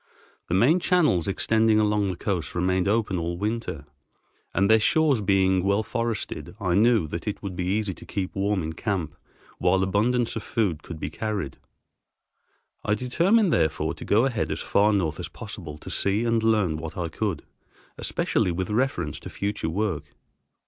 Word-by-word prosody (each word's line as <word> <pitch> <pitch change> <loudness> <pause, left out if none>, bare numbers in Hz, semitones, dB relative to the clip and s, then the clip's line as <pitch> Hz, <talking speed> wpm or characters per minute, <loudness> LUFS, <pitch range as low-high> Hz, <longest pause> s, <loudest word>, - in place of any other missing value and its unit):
The 85 - +1
main 135 - +4
channels 160 - +2
extending 110 +2 +3
along 105 -1 +2
the 95 - -2
coast 90 -4 -2
remain 90 +1 +1
open 105 -3 +1
all 85 +1 -3
winter, 105 -7 -3 0.7
and, 95 +1 +2
their 110 +1 +6
shores 145 +1 +3
being 95 -2 +3
well 100 +2 +2
forested, 115 -4 -3
I 90 -4 0
knew 110 -2 +4
that 85 +4 -5
it 105 - -3
would 95 -3 -4
be 90 - -2
easy 100 0 0
to - - -13
keep 95 -2 -3
warm 100 -2 0
in 80 +1 -4
camp, 95 -3 -3 0.4
while 95 +1 +3
abundance 115 +5 +1
of 115 - -3
food 100 -7 -1
could 80 -2 -8
be 75 - -4
carried. 100 -9 -3 1.2
I 105 - +1
determined, 170 - +2
therefore, 80 -2 +1
to - - -9
go 110 +5 +3
ahead 120 -5 -1
as - - -3
far 105 +1 +3
north 90 -6 0
as 90 - -4
possible, 95 -9 -8
to - - -9
see 100 +4 +1
and 115 -1 +2
learn 105 -8 +2
what 80 +4 -7
I 90 -1 -1
could, 90 -1 -3 0.6
especially - - 0
with 95 +3 -3
reference 105 - -1
to - - -9
future 100 -4 -3
work. 95 -2 -2
100 Hz, 175 wpm, -25 LUFS, 90-110 Hz, 1.2 s, their